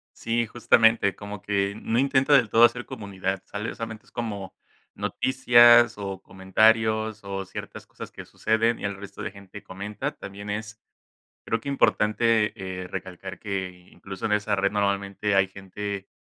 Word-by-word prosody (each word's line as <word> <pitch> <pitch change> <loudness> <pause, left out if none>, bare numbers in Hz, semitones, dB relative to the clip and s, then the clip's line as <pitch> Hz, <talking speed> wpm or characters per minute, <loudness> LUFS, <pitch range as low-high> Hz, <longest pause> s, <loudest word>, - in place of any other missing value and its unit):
Sí, 115 0 -1
justamente, 110 -3 +3
como 100 -1 -8
que 100 -1 0
no 115 - -1
intenta 135 +2 +3
del 125 -6 +5
todo 115 - +6
hacer 120 +1 0
comunidad, 95 -6 -4
sale, 105 +2 -5
solamente 110 -1 -7
es - - -23
como, 100 -5 -5 0.4
noticias 120 -3 +5
o 95 -2 -5
comentarios 110 +3 +2
o 95 0 -4
ciertas - - -9
cosas - - -10
que - - -9
suceden 115 +1 +1
y - - -11
el 100 -1 -2
resto 100 0 -9
de - - -4
gente 100 0 -12
comenta, 105 +8 -5
también 100 +1 -8
es 110 +1 -5 0.6
creo 115 - -1
que 115 - -11
importante 110 -4 +2 0.4
recalcar 90 -2 -7
que 95 -3 -5
incluso 95 -1 -8
en - - -4
esa 105 0 +1
red 100 +1 +1
normalmente 100 0 0
hay 95 -1 +3
gente 100 +1 -6
105 Hz, 155 wpm, -25 LUFS, 100-115 Hz, 0.6 s, todo